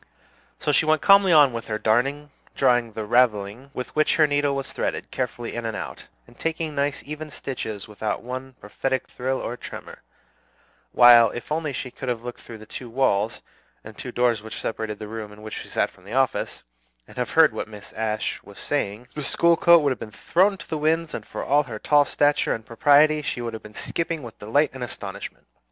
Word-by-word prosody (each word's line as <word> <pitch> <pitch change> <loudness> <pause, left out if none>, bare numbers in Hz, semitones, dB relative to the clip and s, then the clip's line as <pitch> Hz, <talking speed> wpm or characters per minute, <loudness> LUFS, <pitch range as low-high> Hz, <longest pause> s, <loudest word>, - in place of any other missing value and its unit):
So 150 - 0
she 155 - +2
went 155 0 +3
calmly 195 -2 +6
on 145 -5 +6
with 115 -1 -5
her 110 - -2
darning, 135 +7 +1 0.2
drawing 120 -4 +2
the 110 0 -4
"ravelling," 115 +1 +1
with 125 -2 -6
which 155 0 +3
her 155 - +5
needle 145 -1 +1
was 135 -1 -4
threaded, - - -3
carefully 120 -2 -3
in 120 - -4
and 115 -1 -3
out, - - -7 0.2
and 120 - -20
taking 165 -1 -2
nice 140 0 -1
even 150 +1 -6
stitches 110 -8 -5
without 105 0 -3
one 130 +1 -6
prophetic 130 +6 -2
thrill 130 +1 -2
or 120 - -4
tremor; - - -10 0.9
while, 120 -2 +8
if 120 +6 -8
only 155 -1 -1
she 130 -1 -5
could 130 - -6
have 120 -2 -2
looked 120 0 -7
through 115 - -10
the 110 - -12
two 120 +2 -8
walls 115 -3 0 0.4
and 110 0 -11
two 125 - -6
doors 120 -3 +1
which 110 0 -8
separated 110 -2 -4
the 105 - -7
room 110 -1 -6
in 105 +1 -14
which 110 - -7
she - - -10
sat - - 0
from 90 - -22
the 100 +4 -9
office, 130 0 0 0.4
and - - -16
have - - -1
heard - - +6
what - - -5
Mrs. 105 -2 -12
Ashe 110 -1 -2
was - - -15
saying, 105 +5 -2
the 150 - -4
school 170 +4 +4
coat 170 -1 +6
would 140 - +2
have 130 - -3
been 110 - -7
thrown 190 - +2
to - - -11
the 155 - -3
winds, 160 +2 +1
and - - -6
for - - -5
all 145 +2 +3
her 110 -4 -6
tall 145 +6 +4
stature 145 0 +2
and 110 - -9
propriety, 145 +6 +4
she 140 - -3
would 120 -1 -4
have 110 - -6
been 105 0 -13
skipping 165 -3 -3
with 115 -2 -10
delight 140 +9 +1
and 130 -2 -6
astonishment. 100 -4 -7
125 Hz, 215 wpm, -24 LUFS, 110-145 Hz, 0.9 s, while